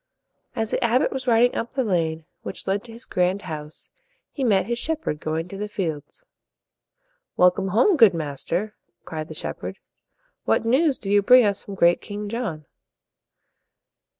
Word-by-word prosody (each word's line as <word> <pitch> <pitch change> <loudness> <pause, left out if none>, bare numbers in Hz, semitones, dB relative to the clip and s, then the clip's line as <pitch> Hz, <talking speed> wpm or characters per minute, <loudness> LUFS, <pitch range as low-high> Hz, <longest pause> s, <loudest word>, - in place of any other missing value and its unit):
As 220 -1 -1
the - - 0
abbot 235 +3 +2
was 265 -1 -5
riding 240 +1 +4
up 230 - -3
the 265 -1 0
lane 165 -6 -1 0.2
which - - -7
led 195 +1 -1
to 235 - -11
his 235 +3 -10
grand 180 +2 0
house, 155 -2 -7 0.4
he 275 - -4
met 200 -7 +3
his 235 +2 -2
shep 320 +2 -3
herd 150 - -2
going 160 +2 -3
to 195 - -7
the 210 - -3
fields. 180 - -5 1.1
"Welcome 180 +2 +4
home, 245 - +3
good 220 -9 +6
master!" 165 +7 -3 0.3
cried 155 -1 -5
the - - -9
shepherd. - - -6 0.7
"What - - +1
news 270 +4 +3
do 200 - -5
you 205 0 +5
bring 250 +3 +7
us 200 -1 +1
from 200 - -8
great 175 -1 +4
King 205 0 -6
John?" 210 -10 -4
205 Hz, 170 wpm, -23 LUFS, 170-235 Hz, 1.1 s, bring